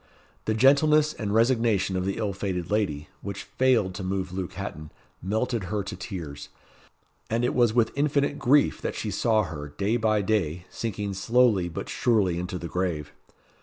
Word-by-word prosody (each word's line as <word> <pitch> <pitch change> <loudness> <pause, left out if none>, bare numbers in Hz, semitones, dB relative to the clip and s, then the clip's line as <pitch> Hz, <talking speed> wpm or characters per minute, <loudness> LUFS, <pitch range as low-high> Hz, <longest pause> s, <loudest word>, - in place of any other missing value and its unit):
The 110 - 0
gentleness 150 +5 +5
and 105 -3 -4
resignation 115 -4 +2
of 90 0 -1
the 95 - -2
ill 105 -3 -1
fated 95 -2 -3
lady, 90 -9 -1
which 100 0 -5
failed 125 -8 +2
to 95 +1 -6
move 95 -1 -2
Luke 95 -2 -4
Hatton, 75 +1 -6 0.3
melted 110 +2 -1
her 105 +2 -2
to 95 - -6
tears; 85 -7 -7 0.8
and 115 +2 +1
it - - 0
was 120 -3 +3
with 120 -2 +3
infinite 145 0 +1
grief 140 +4 +3
that - - -3
she 105 - -3
saw 110 +2 +2
her, 75 -6 -6
day 100 +11 -1
by 110 -3 +1
day, 90 -5 0
sinking 105 -3 -3
slowly 105 -2 +3
but 80 - -6
surely 100 -8 +1
into 90 +1 -4
the 85 - -5
grave. 85 -5 -2
100 Hz, 170 wpm, -26 LUFS, 90-115 Hz, 0.8 s, gentleness